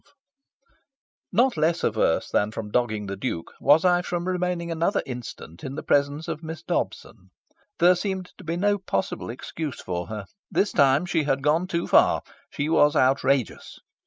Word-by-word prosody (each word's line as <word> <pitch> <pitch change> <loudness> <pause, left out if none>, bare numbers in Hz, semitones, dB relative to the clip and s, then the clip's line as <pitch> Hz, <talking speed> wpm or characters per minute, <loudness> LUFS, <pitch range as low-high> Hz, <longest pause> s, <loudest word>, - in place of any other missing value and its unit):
XII - - -29 1.2
Not 245 +4 +3
less 165 +2 +1
averse 110 -7 +1
than 105 - +2
from 110 -1 -6
dogging 110 -4 0
the 100 0 -4
Duke 95 -5 -4
was 150 +5 +5
I 175 -1 +4
from 175 0 -3
remaining 180 -2 -1
another 165 +4 0
instant 120 -9 -8
in 135 +1 -5
the 155 - -5
presence 145 +2 +1
of 155 - -4
Miss 160 0 -7
Dobson. - - -4 0.5
There 175 +2 +6
seemed 190 -1 -3
to - - -10
be 165 0 -3
no 205 +2 +2
possible 190 0 -3
excuse 145 +4 -5
for 90 -1 -4
her. 105 -2 -6 0.2
This 200 - +1
time 140 +4 +4
she 165 -5 0
had 135 -1 0
gone 160 +5 +2
too 170 -2 -1
far. - - +4 0.3
She 145 - -3
was 150 -2 +4
outrageous. 135 -1 +1
155 Hz, 170 wpm, -25 LUFS, 130-175 Hz, 1.2 s, There